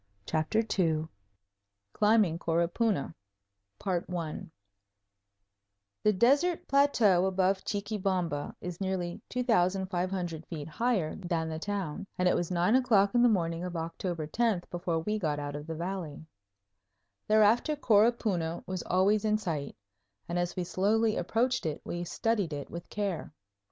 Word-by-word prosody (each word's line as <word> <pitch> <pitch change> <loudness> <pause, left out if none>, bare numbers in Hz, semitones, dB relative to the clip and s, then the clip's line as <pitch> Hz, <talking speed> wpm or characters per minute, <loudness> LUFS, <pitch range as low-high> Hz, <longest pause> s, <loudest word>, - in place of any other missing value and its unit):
CHAPTER 160 - +1 0.2
II 160 -3 +2 0.9
Climbing 210 -6 +3
Coropuna 170 +3 0 0.7
The 175 -4 -3 1.7
desert 285 - +3
plateau 225 -10 +4
above 190 0 +1
Chuquibamba 190 -7 -2
is 180 +1 -6
nearly 185 -2 -2
2500 185 -6 0
feet 155 -4 -6
higher 190 -1 0
than 170 -3 -2
the 160 0 -4
town, 195 -1 -4
and 180 - +2
it - - +3
was 175 - -1
nine 180 +5 +2
o'clock 215 -6 +4
on 240 - +4
the 245 - +6
morning 170 -5 0
of 180 -1 -5
October 165 0 -3
10th 205 +2 0
before 175 -1 -1
we 210 +5 -1
got 155 -6 -1
out 145 0 -4
of 150 +1 -7
the 165 - -4
valley. 170 -3 -5 1.0
Thereafter 220 +7 +4
Coropuna 210 - +2
was 185 -1 -4
always 200 +4 +2
in 215 0 +2
sight, 160 -9 -4 0.5
and 175 +1 -1
as 175 0 -2
we 180 - -1
slowly 215 +5 +1
approached 240 +7 0
it 150 -1 -3
we 175 0 -4
studied 205 -3 -1
it 145 -1 -6
with 170 0 -8
care. 200 -6 -3
185 Hz, 130 wpm, -30 LUFS, 165-215 Hz, 1.7 s, the